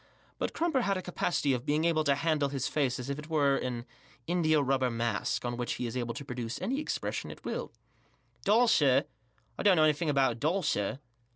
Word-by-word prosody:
l$ut - - -1
Crumper 320 -6 +1
had 200 -4 +1
a - - -3
capacity 175 -5 0
of 125 -1 -2
being 150 +4 +1
able 160 -2 +2
to 140 -1 +4
handle 150 -1 +1
his 135 -2 -2
face 135 -5 0
as 125 - -6
if 140 +1 -3
it 150 +2 -10
were 145 -3 +3
an 120 -2 -3 0.4
indiarubber 150 -7 +2
mask, 115 -1 -1
on 120 0 -2
which 120 -1 -2
he 125 - -4
is 115 - -4
able 120 -2 -2
to 140 - -7
produce 125 -1 -4
any 250 +9 -1
expression 305 - -3
at - - -11
will, - - -3 0.7
"Doll, 225 +4 +4
sir? 140 - +4 0.5
I - - 0
don't 200 -3 +5
know 155 - +4
anything 155 +1 +2
about 135 -3 +3
a - - -5
doll, 175 +8 +1
sir." 105 -5 0
145 Hz, 210 wpm, -30 LUFS, 125-165 Hz, 0.7 s, don't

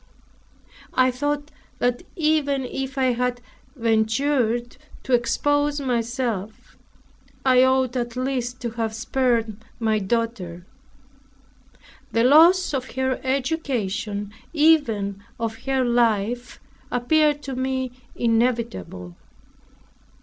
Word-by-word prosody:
I 255 0 +4
thought 290 +3 -2 0.3
that 245 0 0
even 300 -5 +1
if 270 +2 -5
I 260 -2 +3
had 245 0 -1 0.4
ventured 235 +1 +1 0.3
to 260 - -2
expose 290 +5 +2
myself, 235 -5 -3 0.7
I 255 -1 +6
ought 260 -1 +2
at 240 -1 -2
least 255 -1 -2
to 235 -2 -3
have 225 -1 -3
spared 230 -3 0 0.2
my 220 -2 +1
daughter. 195 -5 -2 1.5
The 230 - +3
loss 330 +7 +6
of 260 -2 -3
her 260 0 0
education, 250 - -2 0.2
even 235 -11 +2 0.2
of 225 +1 -4
her 265 -1 +1
life, 235 0 +1 0.3
appeared 295 +4 +2
to 270 -2 -5
me 260 0 -2 0.2
inevitable. 230 - -1
245 Hz, 100 wpm, -23 LUFS, 230-270 Hz, 1.5 s, I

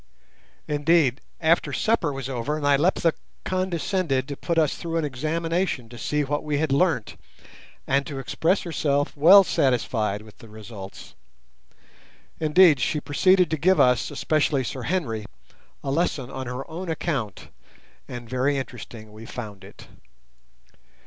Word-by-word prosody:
Indeed, 145 -3 +2 0.2
after 165 +1 +2
supper 220 -9 +1
was 135 -2 -5
over 135 +4 -2
Nyleptha 150 +3 +2 0.3
condescended 185 -6 -1
to 140 - -5
put 170 +4 -3
us 155 -3 +3
through 165 -1 -4
an 160 - 0
examination 155 0 -2
to 120 - -11
see 150 +6 0
what 145 +1 -2
we 150 -1 -1
had 155 -1 0
learnt, 140 - +1 0.7
and 140 +1 +2
to 140 - -6
express 160 +7 0
herself 145 -4 -1
well 180 +7 +8
satisfied 115 - 0
with 110 -1 -17
the 115 - -13
results. 105 -2 -10 1.3
Indeed, 155 -1 +5
she 150 - 0
proceeded 180 +4 +3
to 160 - 0
give 185 +5 +3
us, 125 -2 +3
especially 150 -3 +1
Sir 130 +2 -5
Henry, 125 - -2 0.6
a 135 - -2
lesson 140 -4 -1
on 130 -2 -5
her 125 +2 -5
own 170 +2 -6
account, 135 - -3 0.6
and 120 -1 -8
very 130 +4 0
interesting 120 -4 -8
we 110 +1 -11
found 105 -6 -8
it. - - -13
145 Hz, 140 wpm, -24 LUFS, 125-165 Hz, 1.3 s, well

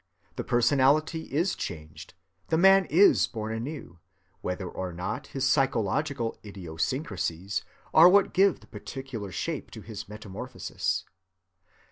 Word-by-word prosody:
The - - -3
personality 140 +6 +2
is 170 +7 +1
changed, 75 -3 -7 0.3
the 160 - +1
man 195 +2 +6
is 180 +6 +5
born 110 -2 -4
anew, 115 - -6 0.4
whether 90 +1 -3
or 90 +1 -5
not 90 +2 -4
his 135 0 -1
psychological 135 -1 0
idiosyncrasies 95 - -3 0.3
are 165 +3 +9
what 200 +1 +4
give 195 0 +3
the - - -16
particular 125 -7 -7
shape 160 - -4
to 110 - -10
his 105 0 -8
metamorphosis. 105 +3 -4
120 Hz, 120 wpm, -28 LUFS, 95-155 Hz, 0.4 s, are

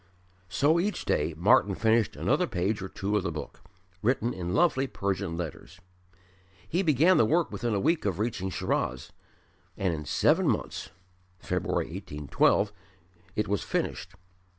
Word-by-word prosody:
So 145 - +3
each 205 +4 -1
day 80 - 0
Martyn 100 +2 +4
finished 110 +1 +2
another - - +1
page 95 +4 -1
or 95 - -5
two 100 +2 -2
of - - +1
the 90 -2 -2
book, 75 -2 -7 0.4
written 120 +1 +1
in 90 -1 -3
lovely 145 -5 +3
Persian 100 -6 -2
letters. 85 +1 -7 0.9
He 175 - 0
began 165 +2 +4
the - - +5
work 165 +7 +1
within 120 -3 -1
a - - +1
week 165 - +1
of 95 -4 0
reaching 105 -3 -2
Shiraz, 65 -7 -2 0.7
and 95 -3 0
in 75 -2 -5
seven - - +3
months - - -2 0.5
(February, - - -1
1812) 75 +7 +1 0.6
it 105 - 0
was 100 -1 0
finished. - - -3
100 Hz, 150 wpm, -28 LUFS, 90-130 Hz, 0.9 s, the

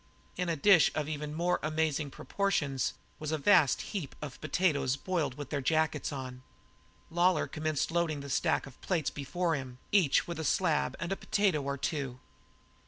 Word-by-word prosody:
In 180 -1 -1
a 165 - +1
dish 175 +2 +6
of 150 -2 -1
even 150 0 -4
more 175 +2 +1
amazing 155 -1 0
proportions 145 -7 -1 0.2
was 155 0 -3
a 155 - +1
vast 150 -4 +4
heap 175 -10 -4
of 145 -3 -8
potatoes 155 -5 +1
boiled 155 -5 -2
with 145 -2 -7
their 145 -2 -1
jackets 160 +4 +1
on. 130 -2 -6 0.7
Lawlor 175 0 +3
commenced 155 -1 -2
loading 165 -4 0
the 140 - -7
stack 160 +2 +1
of 135 -2 -14
plates 165 -6 0
before 165 +5 -1
him, 130 -4 -4
each 185 -9 +4
with 170 -2 -5
a - - -2
slab 160 -2 +1
and 170 +3 -3
a - - +1
potato 195 -6 +1
or 140 0 -3
two. 135 -3 -3
155 Hz, 170 wpm, -31 LUFS, 140-170 Hz, 0.7 s, dish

